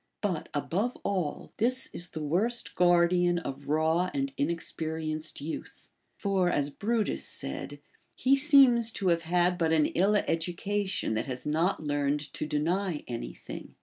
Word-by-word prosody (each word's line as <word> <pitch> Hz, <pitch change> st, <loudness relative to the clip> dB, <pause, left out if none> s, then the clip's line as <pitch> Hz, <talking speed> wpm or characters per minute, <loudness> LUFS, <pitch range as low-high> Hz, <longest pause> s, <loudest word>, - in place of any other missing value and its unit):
But, 185 Hz, -7 st, -2 dB
above 200 Hz, -, -1 dB
all, 185 Hz, -7 st, -2 dB
this 255 Hz, +4 st, +2 dB
is 175 Hz, -, +1 dB
the 155 Hz, -, -6 dB
worst 205 Hz, +11 st, 0 dB
guardian 175 Hz, 0 st, +3 dB
of 140 Hz, -4 st, -6 dB
raw 160 Hz, +4 st, +2 dB
and 135 Hz, -1 st, -2 dB
inex 165 Hz, +4 st, -2 dB
perienced 155 Hz, -1 st, -3 dB
youth. 155 Hz, +3 st, -7 dB, 0.3 s
For, 195 Hz, -3 st, +1 dB
as 145 Hz, -3 st, 0 dB
Brutus 210 Hz, -, 0 dB
said, 145 Hz, -, -3 dB, 0.4 s
he 265 Hz, +2 st, +3 dB
seems 270 Hz, -5 st, +6 dB
to 190 Hz, -, 0 dB
have 170 Hz, -1 st, +2 dB
had 175 Hz, +2 st, +1 dB
but 165 Hz, -1 st, +2 dB
an 155 Hz, -2 st, +4 dB
ill 195 Hz, +7 st, +2 dB
education 190 Hz, -, -1 dB
that 110 Hz, -, -2 dB
has 130 Hz, -1 st, -3 dB
not 160 Hz, +3 st, 0 dB
learned 145 Hz, 0 st, -1 dB
to -, -, -3 dB
deny 165 Hz, +3 st, -1 dB
any 120 Hz, -1 st, -5 dB
thing. -, -, -9 dB
170 Hz, 150 wpm, -29 LUFS, 150-195 Hz, 0.4 s, seems